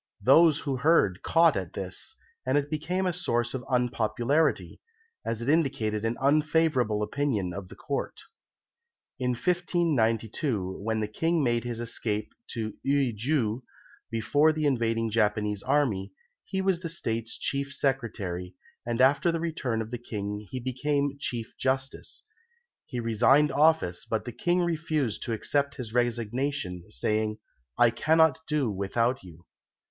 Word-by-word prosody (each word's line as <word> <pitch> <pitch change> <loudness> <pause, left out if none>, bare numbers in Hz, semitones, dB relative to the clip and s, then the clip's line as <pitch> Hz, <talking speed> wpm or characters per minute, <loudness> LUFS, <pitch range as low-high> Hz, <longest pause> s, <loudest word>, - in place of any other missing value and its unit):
Those 155 +3 +6
who 140 -3 -2
heard 125 - +3
caught 165 -1 +4
at 95 -3 -4
this, 95 -1 -5 0.3
and 130 +2 +1
it 145 +1 -1
became 175 +5 -1
a 180 - +1
source 120 -9 -1
of 130 -2 -4
unpopularity, 125 +4 +1 0.4
as 115 0 -3
it - - -5
indicated 135 -9 +1
an 115 +1 -1
unfavourable 145 -6 +2
opinion 105 -8 -1
of 95 0 -6
the - - -12
Court. 140 - -4 1.0
In 125 -1 +1
1592, 120 - 0
when 110 0 0
the 105 - -1
King 165 +8 0
made 120 -2 +1
his 120 -1 -3
escape 110 -2 -2
to 110 -3 -4
Eui 135 -4 +1
ju, 120 0 0 0.5
before 145 +7 +3
the 155 -1 -2
invading 115 -4 +1
Japanese 105 -2 +1
army, 120 -9 0 0.3
he 190 0 -2
was 190 -3 +2
the 170 -2 -5
State's 115 -8 -3
Chief 140 0 -2
Secretary, 100 -11 -2 0.3
and 120 +1 -1
after 140 +6 +4
the 165 - -2
return 135 -9 -2
of 110 - -11
the 120 - -4
King 105 -3 -5
he 130 - -4
became 140 +3 -1
Chief 120 -5 -4
Justice. 135 - -2 0.6
He 125 - -4
resigned 125 +6 +4
office, 145 - +2
but 110 - -1
the 120 - -4
King 175 +9 +1
refused 155 -8 -1
to 115 - -2
accept 140 +5 0
his 115 -4 -6
resignation, 120 -4 -1
saying, 110 - -1 0.4
"I 120 -1 +5
cannot 160 +4 +3
do 145 -7 +1
without 115 +6 0
you." 85 -1 -14
125 Hz, 145 wpm, -28 LUFS, 110-145 Hz, 1.0 s, Those